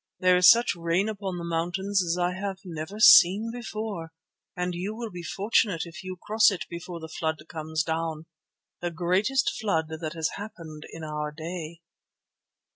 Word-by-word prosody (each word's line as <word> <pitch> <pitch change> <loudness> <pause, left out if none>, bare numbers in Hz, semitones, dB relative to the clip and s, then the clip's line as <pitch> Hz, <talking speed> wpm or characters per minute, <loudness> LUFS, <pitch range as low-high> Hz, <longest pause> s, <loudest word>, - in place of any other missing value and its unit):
There 185 0 +5
is 180 0 +8
such 235 -2 +5
rain 170 +4 0
upon 200 -4 -4
the 170 - -5
mountains 180 +4 0
as 170 0 -1
I 180 0 +1
have 195 +1 -4
never 170 +4 -6
seen 220 0 +7
before, 215 -8 -5 0.5
and 180 0 -1
you 190 +5 -4
will 230 -1 -5
be 175 -1 -7
fortunate 200 -1 +1
if 165 +1 -10
you 185 0 -6
cross 215 +3 +4
it 195 -4 -4
before 170 0 -6
the 160 - -8
flood 160 0 -2
comes 160 -1 -2
down, 160 -1 -3 0.6
the 175 - -1
greatest 185 +10 +1
flood 160 -7 0
that 160 0 -5
has 160 -1 -1
happened 165 -7 -9
in 165 - -8
our 150 -1 -3
day." 165 +1 -7
175 Hz, 170 wpm, -27 LUFS, 160-200 Hz, 0.6 s, is